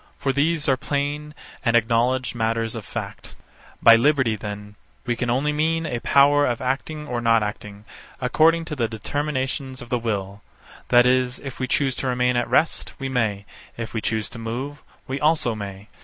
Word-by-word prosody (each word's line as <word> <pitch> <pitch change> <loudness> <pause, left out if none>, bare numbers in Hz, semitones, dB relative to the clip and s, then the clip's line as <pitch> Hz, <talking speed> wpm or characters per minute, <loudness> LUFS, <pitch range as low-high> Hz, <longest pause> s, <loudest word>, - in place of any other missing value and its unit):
For 135 - -1
these 155 +2 +1
are 130 -2 +3
plain 145 +2 -3 0.3
and 120 -2 +2
acknowledged 120 +3 +2
matters 115 -1 -1
of 110 -3 -7
fact. - - -7 0.5
By 115 - +9
liberty, 130 -2 +3
then, 105 0 -7 0.3
we 120 - 0
can 120 +1 -2
only 140 +5 +1
mean 165 +2 0
a 125 -6 -2
power 145 +4 +4
of 120 -2 -1
acting 140 +4 -3
or 120 -3 -2
not 115 -1 +3
acting, 105 0 -6 0.3
according 160 +6 +3
to 160 -2 -5
the 120 -4 0
determinations 130 +2 -3
of 120 - -9
the 125 - 0
will; 100 -3 -3 0.5
that 120 0 +6
is, 125 0 +2
if 135 -2 -8
we 130 - -1
choose 135 +1 +1
to 135 - -2
remain 125 0 +1
at 120 0 0
rest, 165 - +1
we 135 -1 -4
may; 110 -6 -1 0.3
if 115 -1 -5
we 110 - -2
choose 110 -1 -1
to - - -9
move, 125 +6 -5 0.2
we 135 +1 -4
also 150 -5 +2
may. 100 -1 -7
125 Hz, 185 wpm, -23 LUFS, 115-145 Hz, 0.5 s, By